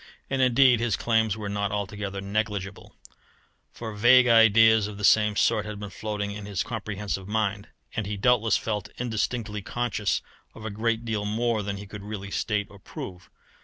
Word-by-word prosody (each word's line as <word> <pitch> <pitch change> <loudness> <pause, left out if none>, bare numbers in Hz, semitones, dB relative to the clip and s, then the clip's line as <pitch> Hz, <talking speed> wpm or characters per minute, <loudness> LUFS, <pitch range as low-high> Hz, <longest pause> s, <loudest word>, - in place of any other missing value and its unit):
And 135 0 +1
indeed 125 -1 +5
his 115 -2 +1
claims 110 -3 +1
were 105 -2 -5
not 100 0 -2
altogether 100 -1 -4
negligible; 100 -1 -3 0.8
for 110 -2 -7
vague 125 +4 +6
ideas 115 -2 +6
of 105 -1 -8
the 105 - -7
same 105 0 +4
sort 105 - +2
had 105 -1 -7
been 105 -1 -7
floating 105 -1 -4
in 100 0 -7
his 95 -5 -1
comprehensive 105 -5 -4
mind, 105 -1 -1 0.3
and 110 -3 -2
he 105 0 -3
doubtless 115 +1 +3
felt 105 -3 -3
indistinctly 110 -2 -2
conscious 110 -1 -1 0.3
of 110 - -10
a 110 - -3
great 115 +2 -1
deal 110 -3 -2
more 110 +1 0
than 100 0 -4
he 100 - -8
could 100 0 -9
really 100 -1 -7
state 105 -1 -1
or 100 - -14
prove. 90 -2 -9
105 Hz, 175 wpm, -26 LUFS, 100-115 Hz, 0.8 s, vague